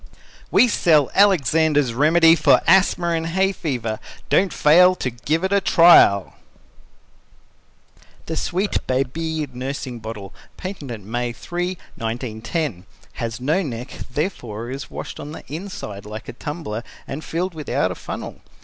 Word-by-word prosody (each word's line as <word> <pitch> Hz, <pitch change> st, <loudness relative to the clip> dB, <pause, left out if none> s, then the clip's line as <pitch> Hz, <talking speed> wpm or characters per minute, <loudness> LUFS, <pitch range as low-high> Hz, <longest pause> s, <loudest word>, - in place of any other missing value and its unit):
WE 250 Hz, -, +5 dB
SELL 155 Hz, -, +3 dB
ALEXANDER'S 160 Hz, -, +3 dB
REMEDY 165 Hz, +5 st, +5 dB
FOR 160 Hz, -, +4 dB
ASTHMA 180 Hz, -1 st, +4 dB
and 165 Hz, 0 st, -3 dB
HAY 190 Hz, +3 st, +1 dB
FEVER 125 Hz, -, -3 dB, 0.3 s
"Don't 190 Hz, -2 st, +3 dB
fail 180 Hz, +6 st, +5 dB
to 130 Hz, -, -3 dB
give 150 Hz, +9 st, -2 dB
it 190 Hz, +1 st, 0 dB
a 200 Hz, -, +3 dB
trial" 165 Hz, -, +6 dB, 1.9 s
The 160 Hz, -, -4 dB
Sweet 185 Hz, +5 st, -1 dB
Babee 150 Hz, +5 st, -1 dB
Nursing 130 Hz, -1 st, -5 dB
Bottle 105 Hz, -3 st, -8 dB, 0.2 s
Patented 145 Hz, -, -6 dB
May 120 Hz, +2 st, -2 dB
3, 175 Hz, +6 st, -4 dB, 0.2 s
1910 115 Hz, -, -4 dB, 0.3 s
Has 115 Hz, 0 st, -3 dB
no 150 Hz, +9 st, +1 dB
neck, 125 Hz, -5 st, -6 dB, 0.2 s
therefore 120 Hz, -, -4 dB
is 135 Hz, +1 st, -6 dB
washed -, -, -7 dB
on 150 Hz, -, -7 dB
the -, -, -9 dB
inside 140 Hz, -, -7 dB
like 110 Hz, +1 st, -8 dB
a -, -, -6 dB
tumbler, 135 Hz, -5 st, -5 dB, 0.3 s
and 145 Hz, +4 st, -6 dB
filled 180 Hz, +3 st, -3 dB
without 155 Hz, -3 st, -1 dB
a -, -, -2 dB
funnel. -, -, -7 dB
150 Hz, 135 wpm, -21 LUFS, 120-170 Hz, 1.9 s, trial